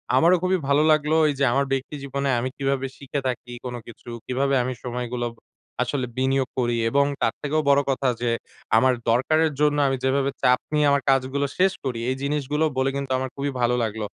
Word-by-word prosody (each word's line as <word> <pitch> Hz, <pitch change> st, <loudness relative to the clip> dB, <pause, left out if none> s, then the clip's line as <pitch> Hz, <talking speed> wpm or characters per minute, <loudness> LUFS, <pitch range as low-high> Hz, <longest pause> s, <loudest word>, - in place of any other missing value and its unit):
আমারও 175 Hz, +3 st, +5 dB
খুবই 185 Hz, +1 st, +2 dB
ভালো 140 Hz, +1 st, +4 dB
লাগলো 155 Hz, 0 st, +2 dB
এইযে 140 Hz, -1 st, -1 dB
আমার 140 Hz, +2 st, +2 dB
ব্যক্তি 135 Hz, +2 st, -2 dB
জীবনে 140 Hz, 0 st, -2 dB
আমি 130 Hz, +2 st, -2 dB
কিভাবে 135 Hz, -1 st, -1 dB
শিখে 140 Hz, +1 st, -4 dB
থাকি 125 Hz, -1 st, -4 dB
কোনো 125 Hz, -1 st, -4 dB
কিছু, 120 Hz, +1 st, -12 dB, 0.2 s
কিভাবে 135 Hz, +2 st, 0 dB
আমি 130 Hz, +1 st, -2 dB
সময়গুলো 125 Hz, -1 st, -3 dB, 0.6 s
আসলে 125 Hz, +1 st, -1 dB
বিনিয়োগ 130 Hz, 0 st, +1 dB
করি 120 Hz, -1 st, +1 dB
এবং 140 Hz, +3 st, +3 dB, 0.2 s
তার 115 Hz, -, +2 dB
থেকেও 155 Hz, +2 st, 0 dB
বড় 140 Hz, 0 st, +5 dB
কথা 135 Hz, 0 st, 0 dB
যে 120 Hz, -, +1 dB, 0.5 s
আমার 130 Hz, +3 st, +4 dB, 0.2 s
দরকারের 155 Hz, +7 st, +3 dB
জন্য 150 Hz, -1 st, +3 dB
আমি 135 Hz, 0 st, 0 dB
যেভাবে 135 Hz, +1 st, +1 dB
চাপ 125 Hz, 0 st, +4 dB
নিয়ে 150 Hz, -1 st, +3 dB
আমার 140 Hz, 0 st, +2 dB
কাজগুলো 135 Hz, +1 st, +1 dB
শেষ 190 Hz, +1 st, +4 dB
করি, 125 Hz, -3 st, -2 dB
এই 130 Hz, -, 0 dB
জিনিসগুলো 145 Hz, +2 st, 0 dB
বলে 130 Hz, +1 st, +2 dB
কিন্তু 140 Hz, -1 st, -4 dB
আমার 130 Hz, 0 st, -3 dB
খুবই 140 Hz, 0 st, -2 dB
ভালো 120 Hz, 0 st, +2 dB
লাগলো। 110 Hz, -1 st, -3 dB
135 Hz, 190 wpm, -24 LUFS, 125-140 Hz, 0.6 s, আমারও